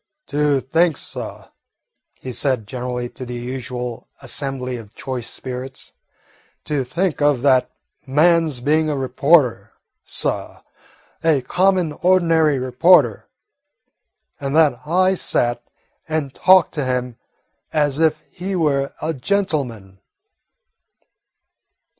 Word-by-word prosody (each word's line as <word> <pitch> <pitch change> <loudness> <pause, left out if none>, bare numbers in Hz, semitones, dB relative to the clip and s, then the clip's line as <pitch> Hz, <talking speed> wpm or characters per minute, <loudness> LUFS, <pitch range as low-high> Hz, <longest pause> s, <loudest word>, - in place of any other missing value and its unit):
"To 145 -1 +2
think, 160 +4 +2
suh," - - -8 0.7
he 130 - -6
said 125 -3 0
generally 125 +2 -4
to 130 - -9
the 125 -1 -6
usual 125 -1 -5
assembly 130 -1 -4
of 110 -1 -12
choice 130 -4 -5
spirits, 130 +1 -7 0.7
"to 145 -3 -1
think 155 +6 -2
of 145 -4 +2
that 130 -3 +4 0.4
man's 155 -1 +3
being 155 +3 +2
a 145 - -1
reporter, 135 0 +2 0.3
suh, - - -3 0.6
a 160 -4 +3
common, 180 +1 +1
ordinary 165 -4 +3
reporter, 130 - +3 1.1
and 140 +1 -3
that 150 -6 +4
I 185 +3 +3
sat 120 -9 -1 0.5
and 155 -4 -2
talked 185 -2 +5
to 150 - -2
him 125 -2 -2 0.5
as 145 -1 +1
if 160 -1 +2
he 190 +2 -4
were 140 -5 0
a 160 +1 -1
gentleman!" 130 - -2
140 Hz, 110 wpm, -20 LUFS, 125-160 Hz, 1.1 s, talked